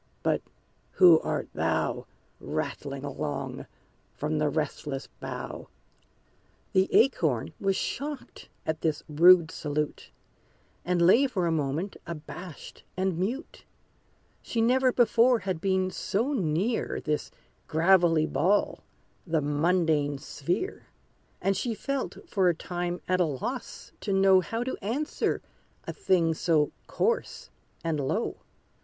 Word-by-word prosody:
but -, -, +1 dB, 0.5 s
who 175 Hz, -4 st, +7 dB
art -, -, -2 dB
thou, -, -, -1 dB, 0.3 s
Rattling 140 Hz, -1 st, -4 dB
along 140 Hz, -, -4 dB, 0.5 s
from 155 Hz, +1 st, -1 dB
the 150 Hz, -1 st, +2 dB
restless 145 Hz, -2 st, -3 dB
bough?" -, -, -6 dB, 1.0 s
The 190 Hz, 0 st, +3 dB
Acorn 160 Hz, -, +2 dB
was 195 Hz, -1 st, +1 dB
shocked 285 Hz, +5 st, -5 dB, 0.2 s
at 160 Hz, -, -2 dB
this 155 Hz, -3 st, -1 dB
rude 165 Hz, +2 st, +6 dB
salute, 150 Hz, 0 st, -3 dB, 0.7 s
And 175 Hz, -1 st, +1 dB
lay 235 Hz, +11 st, +6 dB
for 195 Hz, -9 st, -1 dB
a 170 Hz, -, +1 dB
moment 155 Hz, +5 st, -2 dB
abashed 170 Hz, 0 st, -8 dB, 0.2 s
and 185 Hz, -2 st, 0 dB
mute: 240 Hz, -, -3 dB, 0.8 s
She 230 Hz, -, -3 dB
never 255 Hz, +3 st, +4 dB
before 240 Hz, 0 st, +4 dB
had 185 Hz, -5 st, -3 dB
been 190 Hz, -1 st, +1 dB
so 230 Hz, +9 st, -1 dB
near 190 Hz, -, 0 dB
This 150 Hz, -1 st, -2 dB, 0.4 s
gravelly 165 Hz, -1 st, +4 dB
ball, 185 Hz, +6 st, +1 dB, 0.4 s
the 160 Hz, -1 st, +2 dB
mundane 150 Hz, -1 st, +1 dB
sphere; 170 Hz, -, -3 dB, 0.5 s
And 195 Hz, 0 st, +1 dB
she 230 Hz, +3 st, -2 dB
felt 275 Hz, +3 st, -4 dB
for 190 Hz, -3 st, +2 dB
a 170 Hz, -, +1 dB
time 175 Hz, +1 st, -4 dB
at 185 Hz, 0 st, +2 dB
loss 175 Hz, -, -3 dB
to 205 Hz, -, -3 dB
know 195 Hz, -1 st, +6 dB
How 225 Hz, +6 st, -2 dB
to 260 Hz, -, -3 dB
answer 255 Hz, +10 st, -1 dB, 0.4 s
a -, -, -4 dB
thing 180 Hz, -, +2 dB
so 155 Hz, -2 st, +2 dB, 0.2 s
coarse 470 Hz, +1 st, -1 dB, 0.3 s
and 160 Hz, -2 st, -1 dB
low. 135 Hz, -, -1 dB
175 Hz, 120 wpm, -28 LUFS, 155-205 Hz, 1.0 s, who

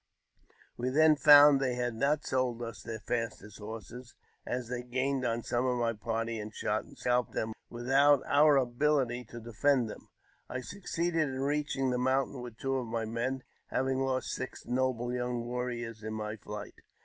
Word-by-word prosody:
We 125 Hz, +1 st, -1 dB
i -, -, -5 dB
hen 155 Hz, -1 st, +7 dB
found 145 Hz, -1 st, +8 dB
they 130 Hz, -2 st, 0 dB
had 120 Hz, -1 st, -1 dB
not 140 Hz, +6 st, +1 dB
sold 125 Hz, -2 st, 0 dB
us 115 Hz, -1 st, -7 dB
their 110 Hz, -1 st, -6 dB
fastest 115 Hz, -3 st, -4 dB
horses, 115 Hz, +3 st, -9 dB, 0.3 s
as 125 Hz, -1 st, -2 dB
they 120 Hz, 0 st, -3 dB
gained 130 Hz, +2 st, -1 dB
on 115 Hz, -1 st, -1 dB
some 120 Hz, +2 st, 0 dB
of 125 Hz, -1 st, +1 dB
my 115 Hz, -1 st, +1 dB
party, 115 Hz, +1 st, -3 dB
and 105 Hz, 0 st, -6 dB
shot -, -, -2 dB
and -, -, -16 dB
scalped 125 Hz, -1 st, 0 dB
them 110 Hz, 0 st, -2 dB, 0.2 s
with 120 Hz, +1 st, -7 dB
i'Ut 140 Hz, +1 st, +5 dB
our 145 Hz, +1 st, +5 dB
abihty 125 Hz, -1 st, +1 dB
to 120 Hz, -, -8 dB
defend 120 Hz, +1 st, +1 dB
them. -, -, -12 dB, 0.4 s
I 130 Hz, -, -3 dB
succeeded 170 Hz, -2 st, -1 dB
in 130 Hz, 0 st, -4 dB
reaching 145 Hz, -2 st, 0 dB
the 125 Hz, -, 0 dB
laountain 130 Hz, +1 st, 0 dB
with 120 Hz, -2 st, -9 dB
two 135 Hz, +1 st, -1 dB
of 125 Hz, -2 st, -3 dB
my 115 Hz, 0 st, -2 dB
men, 120 Hz, +4 st, -2 dB, 0.2 s
having 130 Hz, 0 st, 0 dB
lost 130 Hz, -1 st, -1 dB
six 130 Hz, -, -6 dB
noble 125 Hz, -1 st, 0 dB
young 125 Hz, -1 st, -2 dB
'varriors 120 Hz, -2 st, -4 dB
in 110 Hz, 0 st, -5 dB
my 105 Hz, 0 st, -4 dB
flight. 105 Hz, -1 st, -8 dB
125 Hz, 185 wpm, -31 LUFS, 115-135 Hz, 0.4 s, found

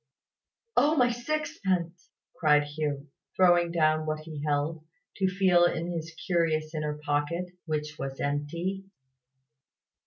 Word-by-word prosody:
"Oh, 300 Hz, +2 st, +4 dB
my 250 Hz, -4 st, +4 dB
sixpence!" 235 Hz, -, -2 dB, 0.3 s
cried 150 Hz, -2 st, +4 dB
Hugh, 145 Hz, -1 st, -3 dB, 0.3 s
throwing 175 Hz, -2 st, +4 dB
down 155 Hz, -1 st, +2 dB
what 155 Hz, 0 st, -2 dB
he 155 Hz, -2 st, -7 dB
held, 150 Hz, +2 st, -1 dB, 0.3 s
to 190 Hz, -, +2 dB
feel 185 Hz, -2 st, +4 dB
in 175 Hz, 0 st, -1 dB
his 165 Hz, -1 st, -4 dB
curious 160 Hz, -3 st, +1 dB
inner 150 Hz, -1 st, -2 dB
pocket, 150 Hz, +3 st, -1 dB, 0.2 s
which 150 Hz, -1 st, -3 dB
was 135 Hz, 0 st, -5 dB
empty. 170 Hz, +7 st, -2 dB
160 Hz, 120 wpm, -28 LUFS, 150-180 Hz, 0.3 s, Oh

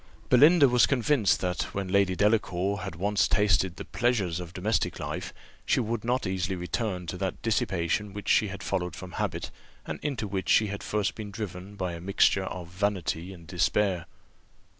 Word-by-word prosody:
Belinda 145 Hz, +4 st, +7 dB
was 125 Hz, -2 st, +4 dB
convinced 125 Hz, -, +2 dB
that, 90 Hz, -3 st, -2 dB
when 100 Hz, -1 st, -2 dB
Lady 100 Hz, -1 st, +3 dB
Delacour 100 Hz, -1 st, +1 dB
had 95 Hz, -2 st, -6 dB
once 100 Hz, +4 st, +1 dB
tasted 95 Hz, -4 st, +2 dB
the -, -, -7 dB
pleasures 105 Hz, -9 st, 0 dB
of 90 Hz, -2 st, -7 dB
domestic 100 Hz, +5 st, -1 dB
life, -, -, -4 dB, 0.3 s
she -, -, +2 dB
would 115 Hz, -1 st, -2 dB
not 125 Hz, +1 st, 0 dB
easily 95 Hz, 0 st, -1 dB
return 90 Hz, +1 st, -3 dB
to 90 Hz, +2 st, -5 dB
that 95 Hz, 0 st, -3 dB
dissipation 100 Hz, -2 st, 0 dB
which 100 Hz, +1 st, -8 dB
she 105 Hz, -, +4 dB
had 100 Hz, 0 st, -7 dB
followed 90 Hz, -2 st, -2 dB
from 95 Hz, -1 st, -9 dB
habit, -, -, -3 dB, 0.3 s
and -, -, -5 dB
into 135 Hz, -8 st, -2 dB
which 95 Hz, -1 st, -3 dB
she 110 Hz, -, +5 dB
had 100 Hz, 0 st, -5 dB
first 105 Hz, -2 st, -1 dB
been 105 Hz, -2 st, -7 dB
driven 100 Hz, -1 st, -7 dB
by 90 Hz, -3 st, -3 dB
a 85 Hz, -, -7 dB
mixture 95 Hz, +1 st, +3 dB
of 90 Hz, -2 st, -6 dB
vanity 90 Hz, -2 st, -2 dB
and 85 Hz, -3 st, -12 dB
despair. 85 Hz, +1 st, 0 dB
95 Hz, 180 wpm, -28 LUFS, 90-105 Hz, 0.3 s, Belinda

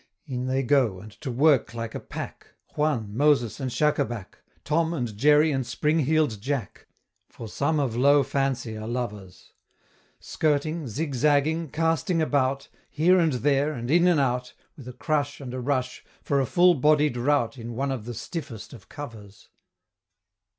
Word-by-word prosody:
In 130 Hz, -3 st, -4 dB
they 130 Hz, +1 st, 0 dB
go, 125 Hz, -8 st, +2 dB
and 105 Hz, +3 st, -11 dB
to 145 Hz, -, -4 dB
work 130 Hz, -1 st, +2 dB
like 115 Hz, -1 st, -5 dB
a -, -, -4 dB
pack, -, -, -8 dB, 0.3 s
Juan, 125 Hz, -9 st, -1 dB
Moses, 135 Hz, -5 st, +2 dB
and 130 Hz, -2 st, -2 dB
Shacabac, 120 Hz, -6 st, -1 dB, 0.2 s
Tom, 165 Hz, +2 st, 0 dB
and 120 Hz, -7 st, -3 dB
Jerry 150 Hz, +6 st, +4 dB
and 135 Hz, -2 st, 0 dB
Springheel'd 150 Hz, -2 st, 0 dB
Jack, 130 Hz, -4 st, -4 dB, 0.4 s
For 115 Hz, -, -9 dB
some 145 Hz, +8 st, 0 dB
of 130 Hz, -5 st, -1 dB
low 140 Hz, +3 st, +5 dB
Fancy 135 Hz, -5 st, -2 dB
are 110 Hz, 0 st, -6 dB
lovers 105 Hz, -6 st, -6 dB, 0.7 s
Skirting, 155 Hz, 0 st, -1 dB
zigzagging, 150 Hz, +4 st, 0 dB
casting 165 Hz, +3 st, 0 dB
about, 140 Hz, -3 st, 0 dB, 0.2 s
Here 180 Hz, +5 st, +3 dB
and 165 Hz, -4 st, +2 dB
there, 140 Hz, +3 st, +1 dB
and 120 Hz, -1 st, -4 dB
in 175 Hz, +2 st, +5 dB
and 175 Hz, -4 st, +4 dB
out, 125 Hz, -2 st, -1 dB, 0.2 s
With 130 Hz, -4 st, -12 dB
a 125 Hz, -, -7 dB
crush, 145 Hz, +2 st, -2 dB
and 130 Hz, -3 st, -7 dB
a 130 Hz, -, -4 dB
rush, 130 Hz, 0 st, -2 dB, 0.2 s
for 140 Hz, -1 st, +1 dB
a 130 Hz, -, -1 dB
full 175 Hz, +7 st, +5 dB
bodied 150 Hz, -2 st, +3 dB
rout 130 Hz, 0 st, 0 dB
In 115 Hz, 0 st, -7 dB
one 135 Hz, +3 st, -1 dB
of 125 Hz, -5 st, -4 dB
the 120 Hz, 0 st, -6 dB
stiffest 110 Hz, -, -7 dB
of 120 Hz, -, -14 dB
covers. 105 Hz, -9 st, -10 dB
135 Hz, 160 wpm, -25 LUFS, 120-150 Hz, 0.7 s, low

